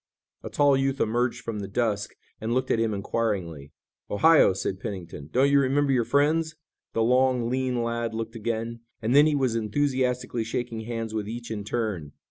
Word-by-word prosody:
A - - -7
tall 145 -1 +4
youth 135 0 0
emerged 120 +2 0
from 110 -2 -4
the 100 - -5
dusk 105 -1 -1 0.2
and 115 +2 -2
looked 130 - 0
at - - +2
them 115 -1 +1
inquiringly. 100 -8 -2 0.4
"Ohio," 160 +4 +5
said 95 0 -3
Pennington, 85 -8 -7
"don't 135 +3 +3
you 140 - +6
remember 140 +1 +2
your 125 -3 +2
friends?" 155 +4 +2 0.4
The 115 - +1
long, 125 0 +2
lean 130 -2 0
lad 115 -1 -2
looked 115 +1 -4
again, 115 +1 -3 0.2
and 115 +4 0
then 145 +2 +7
he 150 - +2
was 130 -4 +1
enthusiastically 125 +1 0
shaking 115 0 -4
hands 115 -1 -4
with 105 -1 -3
each 120 0 -6
in 105 -2 -3
turn. 100 -9 -3
115 Hz, 180 wpm, -26 LUFS, 110-130 Hz, 0.4 s, then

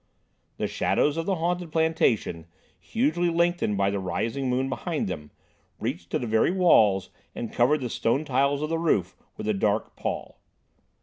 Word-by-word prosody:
The - - -1
shadows 145 0 +1
of 165 0 -3
the 195 - +2
haunted 175 0 -2
plantation, 150 - +1 0.3
hugely 225 - 0
lengthened 170 - +1
by 100 0 +2
the 100 - -1
rising 115 +8 -2
moon 130 +2 +1
behind 155 - -2
them, 75 -5 -5 0.5
reached 85 0 -4
to - - 0
the 125 - -4
very 110 -1 +3
walls 110 - +4 0.2
and 115 - -5
covered 135 +5 +3
the 125 - -2
stone 135 +7 0
tiles 140 +1 +1
of 155 - -2
the 165 0 0
roof 100 - +1 0.2
with - - -5
a 110 - +2
dark 105 +2 0
pall. - - -5
135 Hz, 170 wpm, -26 LUFS, 105-165 Hz, 0.5 s, walls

